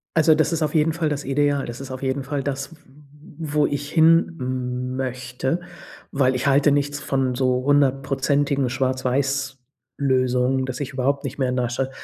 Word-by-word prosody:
Also, 160 Hz, -1 st, +5 dB
das 155 Hz, +1 st, +1 dB
ist 165 Hz, -1 st, -1 dB
auf 150 Hz, -1 st, -1 dB
jeden 160 Hz, 0 st, +3 dB
Fall 160 Hz, -1 st, -1 dB
das 145 Hz, -1 st, -3 dB
Ideal. 140 Hz, +1 st, +1 dB
Das 120 Hz, +1 st, -7 dB
ist 135 Hz, -1 st, -8 dB
auf 130 Hz, 0 st, -6 dB
jeden 135 Hz, 0 st, -1 dB
Fall 140 Hz, 0 st, -3 dB
das, 135 Hz, +2 st, -4 dB
w -, -, -18 dB
w 150 Hz, +1 st, -12 dB
wo 150 Hz, -1 st, +3 dB
ich 145 Hz, 0 st, -4 dB
hin 130 Hz, -6 st, +1 dB
möchte, 130 Hz, +4 st, -3 dB, 0.5 s
weil 130 Hz, -2 st, +2 dB
ich 125 Hz, +2 st, -2 dB
halte 140 Hz, +1 st, +4 dB
nichts 145 Hz, 0 st, 0 dB
von 135 Hz, -3 st, 0 dB
so 130 Hz, 0 st, +1 dB
hundertprozentigen 140 Hz, 0 st, +1 dB
Schwarz-Weiß-Lösungen, 130 Hz, 0 st, -1 dB
dass 130 Hz, +1 st, -5 dB
ich 140 Hz, -1 st, -4 dB
überhaupt 140 Hz, +2 st, 0 dB
nicht 140 Hz, +1 st, -5 dB
mehr 130 Hz, -2 st, +1 dB
in 125 Hz, -, -1 dB
der 125 Hz, -1 st, 0 dB
Stadt 130 Hz, +2 st, -2 dB
135 Hz, 180 wpm, -22 LUFS, 130-145 Hz, 0.5 s, Also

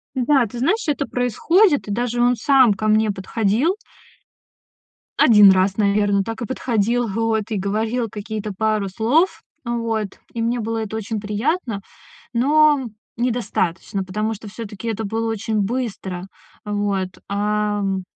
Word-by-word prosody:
Да, 260 Hz, 0 st, +3 dB
ты 235 Hz, +3 st, -8 dB
знаешь, 410 Hz, -, +1 dB
это 280 Hz, -1 st, 0 dB
происходит. 290 Hz, -, +2 dB
И -, -, -3 dB
даже 240 Hz, +2 st, -1 dB
он 245 Hz, +1 st, +4 dB
сам 260 Hz, -1 st, +4 dB
ко 215 Hz, +2 st, -3 dB
мне 215 Hz, 0 st, +3 dB
подходил 220 Hz, -, 0 dB, 1.4 s
1 210 Hz, -4 st, +8 dB
раз, 190 Hz, +1 st, +2 dB
наверно, 200 Hz, -1 st, +2 dB
так 225 Hz, +2 st, -6 dB
и -, -, -1 dB
подходил, 240 Hz, -1 st, 0 dB
вот, 220 Hz, 0 st, -1 dB
и 215 Hz, -, 0 dB
говорил 220 Hz, +4 st, -1 dB
какие-то 210 Hz, 0 st, -5 dB
пару 215 Hz, 0 st, 0 dB
слов. 245 Hz, -, +1 dB, 0.2 s
Вот. 230 Hz, -4 st, -2 dB
И 230 Hz, -, -3 dB
мне 235 Hz, +2 st, 0 dB
было 225 Hz, 0 st, -2 dB
это 220 Hz, 0 st, -6 dB
очень 220 Hz, 0 st, -3 dB
приятно, 215 Hz, -, -2 dB, 0.5 s
но- 290 Hz, +1 st, +3 dB, 0.3 s
недостаточно, 210 Hz, -5 st, -1 dB
потому 215 Hz, +4 st, -2 dB
что, 215 Hz, +1 st, -11 dB
всё-таки, 215 Hz, 0 st, -8 dB
это 225 Hz, 0 st, -3 dB
было 225 Hz, +2 st, -2 dB
очень 220 Hz, 0 st, -1 dB
быстро. 195 Hz, -5 st, -3 dB, 0.4 s
Вот. 205 Hz, -2 st, -1 dB, 0.2 s
Ам 205 Hz, -1 st, 0 dB
220 Hz, 140 wpm, -21 LUFS, 205-240 Hz, 1.4 s, 1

